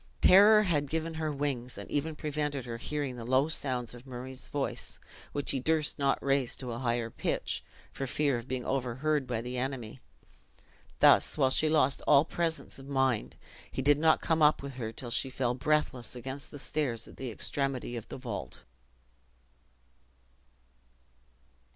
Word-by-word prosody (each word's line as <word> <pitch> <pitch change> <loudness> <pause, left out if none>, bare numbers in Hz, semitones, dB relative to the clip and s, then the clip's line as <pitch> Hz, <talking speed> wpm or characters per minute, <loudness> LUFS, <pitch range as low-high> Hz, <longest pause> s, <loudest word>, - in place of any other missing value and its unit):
Terror 210 +3 +8
had 150 -7 0
given 160 +1 -2
her 160 -1 -2
wings, 135 -4 -3
and - - -7
even 150 +2 -1
prevented 150 -3 -2
her 115 -1 -5
hearing 140 0 -3
the 115 - -6
low 130 +5 +2
sounds 125 -7 -2
of 120 +2 -12
Murray's 130 +1 -7
voice, 145 -2 -3 0.3
which 145 -1 -1
he 135 - -1
durst 155 +2 +1
not 140 -1 +3
raise 135 -3 +2
to 125 -2 -6
a 115 - -4
higher 120 -2 -1
pitch, - - -2 0.3
for 135 - -4
fear 140 +1 +1
of 120 - -11
being 130 -2 -3
overheard 135 +2 0
by 120 -2 -1
the 125 +1 -3
enemy. 130 -2 -4 1.0
Thus, - - +6
while 135 -3 +3
she 155 +3 +2
lost 140 -3 +3
all 145 +1 +6
presence 165 -3 -2
of 135 - -11
mind, 135 -5 0 0.4
he 130 - -3
did 145 +1 +5
not 160 0 +4
come 160 -1 +1
up 150 -2 +5
with 140 -1 -6
her 115 -3 -4
till 120 +1 -6
she 130 +3 0
fell 125 -2 0
breathless 130 -2 0
against 130 +3 -6
he 145 - -9
stairs 135 -5 -2
at - - -14
the 130 - -4
extremity 120 +5 -3
of 115 -2 -6
the - - -7
vault. 120 -5 -6
135 Hz, 170 wpm, -30 LUFS, 125-150 Hz, 1.0 s, Terror